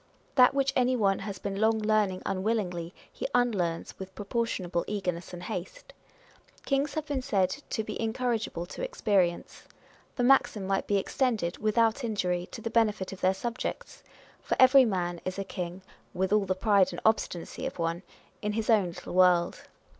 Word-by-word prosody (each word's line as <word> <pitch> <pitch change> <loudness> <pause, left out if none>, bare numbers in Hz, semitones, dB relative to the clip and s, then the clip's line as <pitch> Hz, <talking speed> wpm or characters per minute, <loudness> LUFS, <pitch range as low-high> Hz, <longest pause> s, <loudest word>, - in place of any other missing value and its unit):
That 255 0 +6
which 275 -1 +1
any 255 0 +3
one 195 -5 +2
has 195 -1 -5
been 195 +1 -4
long 220 0 +4
learning 210 -3 +1
unwillingly, 190 -4 -1 0.2
he - - -3
unlearns 195 -9 0
with 190 0 -8
proportionable 200 -5 -2
eagerness 180 -4 -3
and 175 0 -8
haste. 180 0 -6 0.7
Kings 275 +1 0
have 310 -1 -2
been 285 -4 -2
said 190 -6 +1
to 220 - -1
be - - -5
in 225 -1 0
corrigible 230 -8 -2
to - - -7
experience. 200 - 0 0.5
The 245 - 0
maxim 245 -6 +3
might 195 0 -1
be 205 - +2
extended, 210 -4 -1
without 225 +3 +2
injury, 180 -6 -1
to 225 - -8
the 230 0 -4
benefit 210 -5 +1
of 190 - -11
their 185 +1 +3
subjects; 235 +5 -5 0.4
for - - -2
every 260 0 +8
man 175 -5 -2
is 185 +1 -4
a 195 - -2
king 180 -1 -6 0.3
(with 190 +2 0
all 210 -2 +3
the 185 0 0
pride 200 0 +3
and - - -6
obstinacy 220 +2 0
of 265 - -7
one) 165 0 -1 0.4
in 210 0 -1
his 225 +1 0
own 205 -5 +4
little 170 - -8
world. 180 -1 +3
205 Hz, 175 wpm, -28 LUFS, 185-230 Hz, 0.7 s, every